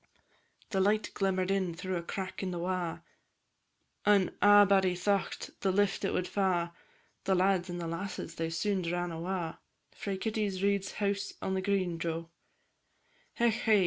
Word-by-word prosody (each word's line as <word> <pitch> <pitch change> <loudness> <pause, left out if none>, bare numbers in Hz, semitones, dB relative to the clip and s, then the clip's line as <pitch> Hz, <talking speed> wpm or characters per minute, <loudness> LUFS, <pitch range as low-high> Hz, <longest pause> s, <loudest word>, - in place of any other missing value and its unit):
The 195 - +1
light 210 +2 +2
glimmer'd 190 -1 +1
in 190 -4 0
through 185 +2 -3
a 170 - -1
crack 190 +2 -5
i' 190 - -1
the 180 - -3
wa', 180 -1 -2 1.0
An' 205 -2 +4
a'body 200 -3 +6
thocht 195 +2 -1
the 195 - +1
lift 205 +1 +1
it 195 - +1
wad 180 - 0
fa', 180 -3 0 0.5
And 190 -1 +4
lads 185 -1 +2
and 175 - -4
lasses 180 -1 -4
they 165 -1 -2
soon 195 +3 0
ran 175 0 -1
awa' 170 0 -3 0.3
Frae 195 -2 -4
Kitty's 205 -2 -1
Reid's 200 -1 +1
house 200 -1 -1
on 190 - -2
the 190 - 0
green, 185 -4 0
Jo! 165 0 -3 1.1
Hech, 235 -1 +3
hey! 220 -2 +3
190 Hz, 155 wpm, -31 LUFS, 175-200 Hz, 1.1 s, a'body